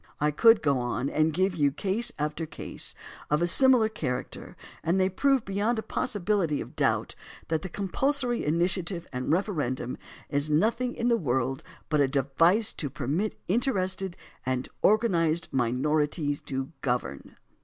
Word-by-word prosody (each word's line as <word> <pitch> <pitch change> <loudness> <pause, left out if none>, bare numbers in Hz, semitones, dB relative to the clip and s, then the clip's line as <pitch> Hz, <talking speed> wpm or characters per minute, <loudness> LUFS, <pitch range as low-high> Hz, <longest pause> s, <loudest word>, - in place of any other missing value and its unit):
I 150 +1 +2
could 225 +8 +5
go 140 -4 +2
on 120 +2 -2
and 155 +1 +2
give 185 +4 +1
you 145 -3 +2
case 200 - -1
after 150 +2 -2
case - - -5 0.3
of 150 - +2
a - - +4
similar 250 +4 +5
character 130 -12 -5 0.3
and 175 +4 +1
they 185 0 +3
prove 270 +6 +2
beyond 205 +4 0
the 220 - -2
possibility 200 - 0
of - - -8
doubt - - +1 0.4
that 160 -1 0
the 190 - -6
compulsory 245 - -1
initiative 170 +2 0
and 125 +3 -2
referendum 150 - -1 0.3
is 145 +1 +1
nothing 230 +10 +1
in 235 +1 0
the 235 - +4
world 130 - -1 0.3
but 150 -2 +2
a 140 - +4
device 165 - +3
to 145 - -3
permit 145 - -2
interested 190 -4 0 0.3
and 130 0 -2
organized 170 -7 +2
minorities 145 +4 0
to 135 +1 -4
govern. 125 -2 -3
165 Hz, 150 wpm, -27 LUFS, 145-205 Hz, 0.4 s, could